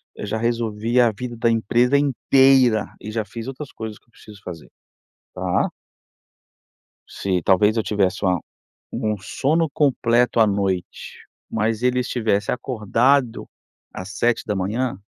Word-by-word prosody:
eu - - -6
já 110 - -2
resolvi 115 0 0
a 120 -2 +4
vida 120 +3 -6
da 115 0 +2
empresa 120 +4 +2
inteira 135 -4 +3
e 105 - -7
já 110 -1 -2
fiz 115 +3 -8
outras 135 +1 -7
coisas 110 -2 -7
que - - -30
eu 120 - -34
preciso 105 -2 -15
fazer, 85 -3 -9 0.7
tá? - - 0 1.4
Se 95 -2 -1
talvez 105 +4 +3
eu - - +2
tivesse 100 -2 0
uma 90 -1 +2 0.6
um 105 0 -1
sono 150 - 0
completo 125 -5 +2
à 110 - +6
noite, 95 -3 -3 0.3
mas 110 +2 -1
ele 125 0 +2
estivesse 110 -5 -1
acordado 125 +2 +1 0.5
às 100 +3 -8
7:00 110 -1 -1
115 Hz, 135 wpm, -22 LUFS, 105-125 Hz, 1.4 s, à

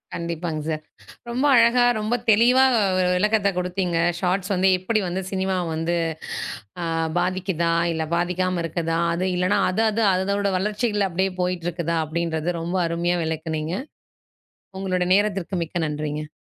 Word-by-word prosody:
கண்டிப்பாங் 170 -1 -3
சார். 155 -1 -2 0.5
ரொம்ப 250 +4 -1
அழகா, 235 +1 +5 0.2
ரொம்ப 215 +3 0 0.2
தெளிவா 245 +5 +5 0.3
ஒரு 180 -1 +2
விளக்கத்த 210 +1 +2
கொடுத்தீங்க. 180 -1 -1 0.2
ஷாட்ஸ் 190 +2 0
வந்து 190 +1 +3
எப்படி 215 +4 0
வந்து 185 +2 -2
சினிமாவ 190 -1 0
வந்து 165 +2 -1 0.9
அ - - -1 0.4
பாதிக்குதா, 180 -2 0 0.2
இல்ல 160 -1 -2
பாதிக்காம 180 0 0
இருக்குதா? 165 0 -1 0.2
அது 180 +2 -1
இல்லனா 185 +3 +2
அது 205 +5 0
அது 220 +1 0
அதோட 200 +2 0
வளர்ச்சியில 210 0 0
அப்படியே 190 +2 0
போயிற்றுக்குதா 175 -2 -1
அப்படின்றத 165 +1 -2
ரொம்ப 175 +3 -2
அருமையா 170 +1 0
விளக்குனீங்க. 160 0 -3 1.0
உங்களுடைய 185 -2 -1
நேரத்திற்கு 200 -3 -1
மிக்க 175 - -5
நன்றிங்க. 150 0 -4
180 Hz, 130 wpm, -23 LUFS, 170-195 Hz, 1.0 s, அழகா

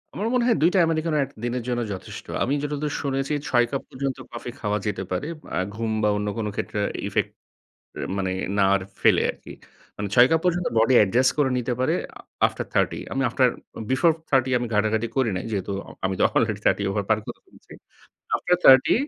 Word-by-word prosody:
আমার 210 - -2
মনে 250 -1 +2
হয় 235 - +3
২ 165 - +6
টা - - +5
Americano 160 -1 0
একদিনের 120 -2 -4
জন্য 120 -1 -1
যথেষ্ট। 95 - -8 0.2
আমি 135 - 0
যতদূর 150 0 -2
শুনেছি 135 +1 -1
৬ 120 -1 +3
কাপ 135 - -2
পর্যন্ত 135 0 -3
কফি 120 +1 -6
খাওয়া 105 -1 0
যেতে 105 -2 -2
পারে। 90 +9 -2 0.3
আ - - +1 0.2
ঘুম 115 0 -2
বা 105 - +4
অন্য 105 0 -2
কোন 110 -2 -2
ক্ষেত্রে 105 - -3 0.3
ইফেক্ট - - -1 0.9
মানে 95 -1 -1 0.3
না 100 - +4
আর 100 - +1 0.2
ফেলে - - +4
আরকি। - - -12 0.4
মানে 105 0 -3
৬ 120 +1 +7
কাপ 165 0 +3
পর্যন্ত 180 -1 +1
বডি 115 +3 +4
অ্যাডজাস্ট 120 +6 +4
করে 140 -3 +3
নিতে 125 0 -2
পারে 130 - +2 0.2
আ - - -11 0.3
আফটার - - -5
30 - - +1
আমি 135 - 0
আফটার 125 +2 +3 0.4
বিফোর 140 +6 +4 0.2
30 130 -2 +3
আমি 120 - -3
ঘাঁটাঘাঁটি 110 +2 +1
করি 130 -4 +2
নাই। 90 - -4
যেহেতু 100 -2 -2 0.2
আ - - -11
আমি 95 0 0
তো - - +4
অলরেডি - - +1
30 - - +3
ওভার 100 0 -1
পার 110 -1 +3
করে - - -7
ফেলেছি। - - -19 0.6
আফটার 180 - +1
30 130 -1 +7
125 Hz, 200 wpm, -24 LUFS, 105-140 Hz, 0.9 s, ৬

